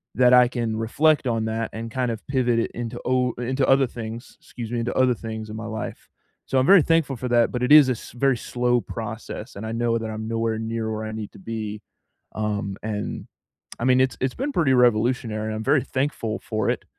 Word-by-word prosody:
that 125 +2 +5
I 125 0 +7
can 120 -3 -2
reflect 145 +6 +2
on 115 -2 0
that 110 0 -2
and 115 +1 -6
kind 125 0 -1
of 110 - -7
pivot 125 -4 +1
it 115 - -1
into 120 0 -5
o 125 -1 +1
into 130 +2 -1
other 135 -1 +4
things- 115 0 -8
excuse 115 -2 -8
me- 120 - -1
into 115 +1 -2
other 130 -1 +4
things 110 -1 -6
in 105 - -6
my 115 - -6
life. 110 -1 -6 0.4
So 135 - -1
I'm 130 - +2
very 195 +2 +8
thankful 160 -3 +2
for 125 - -4
that, 120 -1 +3
but 125 - -3
it 125 - 0
is 150 -4 +9
a - - +3
s 120 - -10
very 130 0 +2
slow 125 +1 0
process, 115 +2 -7
and 105 - -6
I 110 - -4
know 115 0 +1
that 115 -1 -4
I'm 110 0 -5
nowhere 115 -1 -1
near 115 0 -3
where 110 0 -3
I 110 - -5
need 110 -1 -6
to - - -13
be. 105 0 -5 0.5
Um, 105 -2 -2
and, 105 -1 -4 0.5
I 115 - -3
mean, 130 0 +4
it's 130 -2 +2
it's 130 0 -1
been 275 +4 -2
pretty 160 - +2
revolutionary. 115 -2 +2
I'm 110 - -4
very 140 0 +3
thankful 130 -5 -2
for 110 -2 -2
it, - - -3
115 Hz, 225 wpm, -24 LUFS, 110-130 Hz, 0.5 s, is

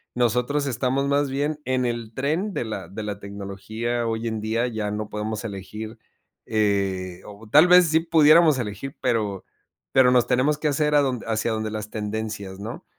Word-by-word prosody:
nosotros 125 +4 +1
estamos 135 +1 0
más 140 0 +1
bien 145 +3 -1
en 130 -1 0
el 115 -2 -3
tren 160 - -1
de - - -2
la 110 - -5
de 105 +2 -6
la 105 -2 -5
tecnología 100 +4 -4
hoy 115 0 -2
en 110 -1 -3
día, 115 +3 0
ya 110 -3 -3
no 105 0 -4
podemos 105 +1 -4
elegir, 110 +2 -7 0.5
eh, 100 -4 0
o 105 +2 -12
tal 150 +8 +7
vez 180 -1 +7
sí 160 +1 +3
pudiéramos 160 -2 +5
elegir, 110 +5 -5
pero 105 -5 -1 0.5
pero 130 -1 +5
nos 125 -2 +3
tenemos 130 +4 +2
que 150 0 -1
hacer 150 +1 +1
a 145 - +6
donde 130 -4 -2
hacia 110 0 -1
donde 110 -1 -2
las 105 -1 -5
tendencias, 105 -2 -5
¿no?, 110 +3 -7
115 Hz, 180 wpm, -24 LUFS, 105-140 Hz, 0.5 s, tal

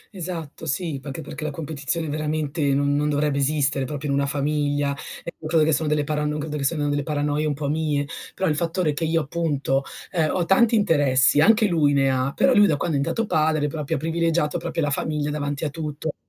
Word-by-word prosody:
Esatto, 165 -3 -6
sì. 155 -2 -2
Perché- 140 +3 -6
perché 155 0 -8
la 155 - -1
competizione 155 +1 -3
veramente 155 +1 -2
non 140 0 +1
non 150 +1 +1
dovrebbe 145 -1 0
esistere 140 -1 +2
proprio 145 +1 -5
in - - +1
una 140 0 +1
famiglia 145 0 0 0.3
e 170 - -6
credo 155 0 +2
che 160 - +2
sono 150 +2 +1
delle 150 -1 +1
parano 150 0 -2
credo 150 0 -4
che 140 - -3
sono 145 0 +1
delle 145 0 0
paranoie 150 +1 -1
un 145 - -1
po' 145 -1 -4
mie. 150 -1 0 0.3
Però 190 - -1
il 150 - +1
fattore 165 -1 0
che 165 +2 -1
io, 165 0 +1
appunto, 145 -3 -1 0.3
ehm, 160 -3 +1
ho 175 -2 0
tanti 230 +5 +4
interessi, 145 -8 +4
anche 220 +4 +5
lui 155 -7 +2
ne 135 -1 +3
ha, 130 +1 0
però 270 - +3
lui 205 -3 +6
da 150 - +1
quando 155 +1 -1
è - - 0
diventato 225 +10 -1
padre 155 -4 +1
ha 150 - -1
proprio 150 -2 -3
privilegiato 165 +1 0
proprio 165 -1 -3
la 145 - 0
famiglia 150 0 -1
davanti 145 0 -3
a 150 - -2
tutto, 155 -1 -5
150 Hz, 215 wpm, -23 LUFS, 145-160 Hz, 0.3 s, lui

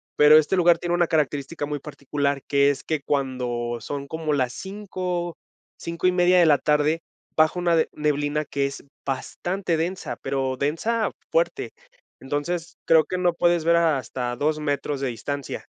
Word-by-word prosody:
pero 150 +1 +8
este 155 +5 0
lugar 175 -2 +4
tiene 175 0 -1
una 175 0 +3
característica 145 -1 -1
muy 150 - -2
particular 140 -1 -2
que 140 0 +4
es 140 - -6
que 155 -2 -2
cuando 125 -4 -1
son 140 +2 -5
como 160 0 -2
las 130 -3 0
5, 185 -3 -4 0.4
5:30, 180 +1 +2
de 170 - +6
la 145 -2 +6
tarde, 150 +3 +1 0.3
bajo 155 +3 +3
una 170 -1 +2 0.2
neblina 150 0 0
que 140 -1 -1
es 140 0 -5 0.2
bastante 175 +6 -2
densa, 175 +3 -3
pero 135 -1 -1
densa 190 - 0 0.2
fuerte. - - 0 0.5
Entonces 160 +5 -3
creo 160 -1 +6
que 185 - -3
no 175 -1 +2
puedes 175 -1 +2
ver 170 +1 +4
hasta 130 -6 0
2, 150 +4 0
metros 145 -1 -2
de 135 - 0
distancia. 140 +4 -5
150 Hz, 155 wpm, -24 LUFS, 140-175 Hz, 0.5 s, pero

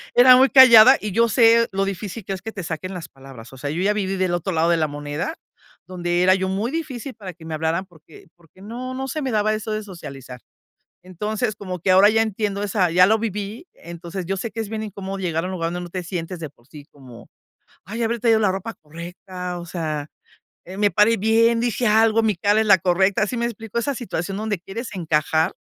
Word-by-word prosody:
Era 250 +1 +8
muy 265 +1 +5
callada 255 -1 +9
y 210 - -4
yo 230 +4 +2
sé 230 +1 +4
lo 195 0 0
difícil 195 +1 -6
que 195 - -3
es 190 - -7
que 225 - -6
te 195 -4 -7
saquen 165 +3 -5
las 175 -2 -7
palabras, 135 -3 -13
o - - -11
sea, 145 +2 -5
yo 160 +5 -3
ya 205 +2 +2
viví 195 -2 -2
del 185 -1 0
otro 175 +2 -2
lado 165 +1 +2
de 170 - +3
la 155 -1 +1
moneda, 145 - -5 0.5
donde 175 -1 -1
era 185 +1 +5
yo 190 0 -2
muy 205 +6 -2
difícil 280 -5 -5
para 195 -4 -9
que 165 -1 -15
me 160 - -6
hablaran 160 +4 -1
porque 165 -3 -18
porque 175 +2 -22
no, 245 +4 -6
no 265 +1 -4
se 310 +4 -4
me 270 - -2
daba 215 0 +1
eso 215 0 -4
de 215 0 -3
socializar. 135 -10 -10 0.6
Entonces, 210 +5 -3
como 185 -3 -6
que 185 +3 +1
ahora 190 +3 +7
ya 225 +1 +2
entiendo 205 -2 -2
esa 195 -3 +1
ya 180 +2 +6
lo 220 +3 +3
viví. 210 - -5
Entonces, 170 +2 -8
yo 195 +3 -2
sé 215 +4 -4
que 230 - -7
es 220 - -5
bien 220 0 -4
incómodo 195 -2 -6
llegar 165 -3 -2
a - - -3
un - - -5
lugar 170 -3 -2
donde 175 +1 -4
no - - -10
te 180 +1 -5
sientes 175 0 -5
de 155 -3 -6
por 120 -3 -29
sí 145 -1 -13
como: 125 -4 -15 0.6
"Ay, 225 +5 -5
¿habré 230 +1 -1
traído 225 -1 +3
la 205 -3 +2
ropa 195 +4 -5
correcta?", 180 +3 -8
o 170 - -8
sea, 155 -4 -4 0.6
eh, 185 +2 -10
"¿me 205 0 +3
pare 210 +3 +3
bien?, 230 +3 +3
¿dije 240 0 -1
algo?, 220 +1 +4
¿mi 220 -2 +1
cara 205 +4 +2
es 220 - 0
la 195 -2 +6
correcta?". 190 +3 +2
¿Sí 245 - -4
me 235 - -1
explico? 225 -1 -5
Esa 275 +4 -1
situación 195 -6 -4
donde 215 -2 -2
quieres 215 +7 -7
encajar, 160 -1 0
195 Hz, 235 wpm, -22 LUFS, 170-220 Hz, 0.6 s, callada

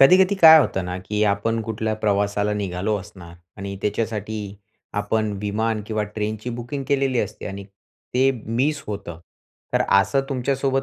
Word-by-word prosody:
कधी-कधी 185 +7 +6
काय 160 -1 +11
होतं 95 -9 +1
ना 90 0 -4
की 105 +1 0
आपण 115 +3 -1
कुठल्या 110 0 -2
प्रवासाला 105 0 +1
निघालो 100 +1 -1
असणार 95 -4 -12 0.2
आणि 100 -1 -5
त्याच्यासाठी 110 0 -2 0.6
आपण 110 0 0
विमान 110 +1 -1
किंवा 110 -1 -1
ट्रेनची 110 +2 -3
बुकिंग 120 +4 -5
केलेली 135 -3 +1
असते - - -5
आणि 100 0 -6 0.5
ते 130 +2 +4 0.2
मिस 135 +7 0
होतं. 100 -5 -6 0.5
तर - - +3
असं 105 +8 +4
तुमच्यासोबत 135 0 0
110 Hz, 145 wpm, -23 LUFS, 100-130 Hz, 0.6 s, काय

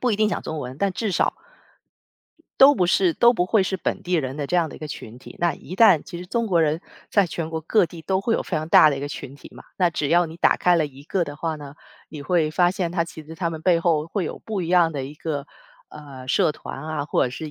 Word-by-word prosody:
不 245 -3 +1
一 - - 0
定 215 0 +2
讲 - - -2
中 155 -1 -5
文， 130 +2 -7
但 200 -1 0
至 215 +1 -2
少， - - +1 1.2
都 275 +2 +8
不 180 - +1
是 180 -1 +3
都 240 +6 +5
不 180 -6 0
会 205 -1 +3
是 190 - -2
本 190 - -3
地 180 - -4
人 135 -4 -1
的 145 -2 -3
这 180 - -3
样 165 -2 +2
的 - - -10
一 - - -12
个 155 - -6
群 120 -4 -9
体。 - - -13
那 175 -1 +1
一 185 - -10
旦 195 -7 +6
其 175 - -8
实 180 - -7
中 230 +5 -1
国 170 -5 +3
人 155 +2 0 0.3
在 200 -3 +3
全 165 -1 -5
国 160 -1 -3
各 195 +5 +2
地 165 +1 -11
都 190 +3 -1
会 225 +3 -1
有 - - -1
非 170 - -2
常 155 +1 -3
大 155 - +7
的 140 - -2
一 - - -5
个 145 - -4
群 135 -1 -8
体 145 - -13
嘛， - - -13
那 180 -2 +2
只 150 -3 -2
要 175 +3 +4
你 160 +1 -10
打 - - +3
开 180 -1 +3
了 155 -3 +1
一 140 0 -14
个 175 +3 -1
的 145 - -8
话 160 0 -3
呢， 145 -1 -10 0.3
你 150 -2 -8
会 160 -2 +1
发 175 +1 +3
现 180 -2 -3
他 170 -2 +1
其 160 -1 -10
实 160 +2 -10
他 170 -1 -2
们 160 -1 -6
背 170 -1 +3
后 160 -3 +1
会 185 0 -2
有 - - -5
不 210 -4 -4
一 165 - -4
样 175 -2 +4
的 135 -2 -4
一 140 - -9
个， 145 -3 -4 0.4
呃， 135 -4 -11
社 150 - +2
团 135 - -9
啊， 155 -2 -3
或 - - +1
者 125 - -2
是 155 +4 -7
165 Hz, 310 characters per minute, -23 LUFS, 150-180 Hz, 1.2 s, 都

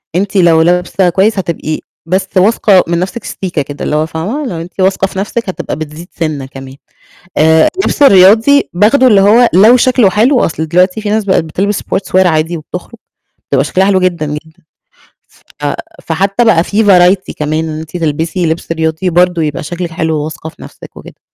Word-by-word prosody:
أنتِ 200 +2 -2
لو 165 -3 +4
لابسة 180 +2 +1
كويس 200 +4 +1
هتبقي 160 -3 -4 0.3
بس 190 +2 -1
واثقة 195 -1 +3
من 170 0 -1
نفسِك 195 +5 -4
سيكا 175 -6 -4
كده، 145 +1 -7
اللي 150 - -1
هو 155 +1 +1
فاهمة، 200 - -4
لو 165 -5 -5
أنتِ 180 +3 -12
واثقة 195 0 +1
في 190 - -6
نفسِك 210 +1 -3
هتبقى 170 -2 -5
بتزيد 155 +3 -8
سِنّة 155 -5 -4
كمان. 135 0 -11 0.6
آآ، 160 +1 +4
اللبس 380 -5 -2
الرياضي 220 +6 +5
باخده 230 +8 +3
اللي 205 -4 +4
هو 230 +4 +4
لو 220 +7 +6
شكله 245 -5 +3
حلو، 240 +6 +2
أصل 160 0 -4
دلوقتي 185 +5 +1
في 210 - -4
ناس 215 -1 0
بقت 190 -4 +1
بتلبس 195 +6 -2
sportswear 190 -1 0
عادي 160 0 0
وبتخرج، 180 +8 -9 0.5
بتبقى 135 -1 +1
شكلها 190 +5 +1
حلو 190 -2 +2
جدًا، 175 -4 -1
جدًا. 160 +3 -8 1.0
ف - - -7 0.4
فحتى 200 +5 0
بقى 175 -7 +3
في 215 +2 0
variety 185 -1 +3
كمان 155 +2 -2
إن 155 0 -5
أنتِ 160 +2 -8
تلبسي 165 +2 -2
لبس 165 +1 -3
رياضي 160 +3 -2
برضه 175 -1 +1
يبقى 150 -2 -3
شكلِك 175 +2 -5
حلو، 160 -1 -2
وواثقة 155 +1 -6
في - - -19
نفسِك - - -13
وكده. - - -13
180 Hz, 185 wpm, -12 LUFS, 160-200 Hz, 1.0 s, لو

